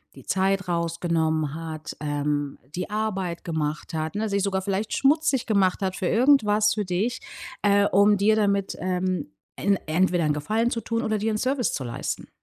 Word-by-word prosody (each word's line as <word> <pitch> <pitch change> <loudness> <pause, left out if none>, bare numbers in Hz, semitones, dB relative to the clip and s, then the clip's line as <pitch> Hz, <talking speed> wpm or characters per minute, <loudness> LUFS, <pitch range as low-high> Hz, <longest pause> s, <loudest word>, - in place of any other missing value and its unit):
die - - -13
Zeit 195 0 +1
rausgenommen 165 -3 0
hat, 160 -1 -6
ähm, 145 -1 -1 0.2
die 180 +1 -3
Arbeit 195 -5 -2
gemacht 160 0 -3
hat, 160 +3 -3
ne, 220 +1 -1
sich 200 -1 0
sogar 190 -1 0
vielleicht 200 +2 -2
schmutzig 285 -2 +2
gemacht 200 -3 +2
hat 190 -1 -1
für 180 - -2
irgendwas 215 -4 +4
für 210 -2 -1
dich, 205 +8 -1 0.4
äh, 200 0 +4
um 205 +2 +4
dir 210 +2 +3
damit, 200 -2 +1
ähm, 185 0 -1 0.3
en 200 -1 +2
entweder 175 +1 +2
'n 150 - +2
Gefallen 220 +11 0
zu 230 - -2
tun 230 +1 -2
oder 220 -2 0
dir 220 +2 0
'n 215 - 0
Service 255 +1 0
zu 135 - -3
leisten. 120 - -4
190 Hz, 180 wpm, -25 LUFS, 165-215 Hz, 0.4 s, irgendwas